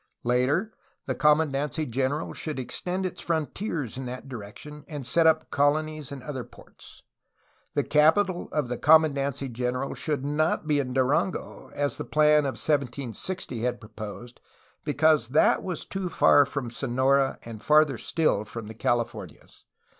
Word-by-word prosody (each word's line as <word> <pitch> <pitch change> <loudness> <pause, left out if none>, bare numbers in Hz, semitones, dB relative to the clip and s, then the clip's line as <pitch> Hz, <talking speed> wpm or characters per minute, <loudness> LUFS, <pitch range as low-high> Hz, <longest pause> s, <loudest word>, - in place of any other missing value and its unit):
Later, 130 - +1 0.3
the 130 - -1
commandancy 150 +2 +1
general 135 +5 -1
should 155 -4 -4
ex 125 - -5
tend 185 +1 -2
its 185 - -4
frontiers 160 - -3
in 130 - -5
that 125 +2 -7
direction 130 +5 -9
and 145 -4 -6
set 165 +5 +3
up 160 -1 +2
colonies 150 +1 0
in 135 -3 -7
other 135 -4 -5
ports. - - -16 0.7
The - - +2
capital 170 +5 +3
of 150 -4 -1
the 125 0 -4
commandancy 140 -3 +3
general 125 +3 -2
should 145 -3 -3
not 155 +2 0
be 150 -2 +2
in 130 -2 -2
Durango, 135 +7 -1
as 145 -3 -1
the - - -4
plan 150 -1 +4
of 135 - -1
1760 140 +1 -2
had 125 +1 -1
proposed, 110 +2 -9 0.4
because 150 -3 +3
that 140 +6 +3
was 180 -4 -4
too 190 -2 -4
far 145 -3 +5
from 140 -4 -4
Sonora 135 +2 +1
and 115 -2 -9
farther 150 -4 +4
still 155 -11 +1
from 110 +1 -8
the 110 - -8
Californias. 120 +1 -3
140 Hz, 150 wpm, -26 LUFS, 125-155 Hz, 0.7 s, far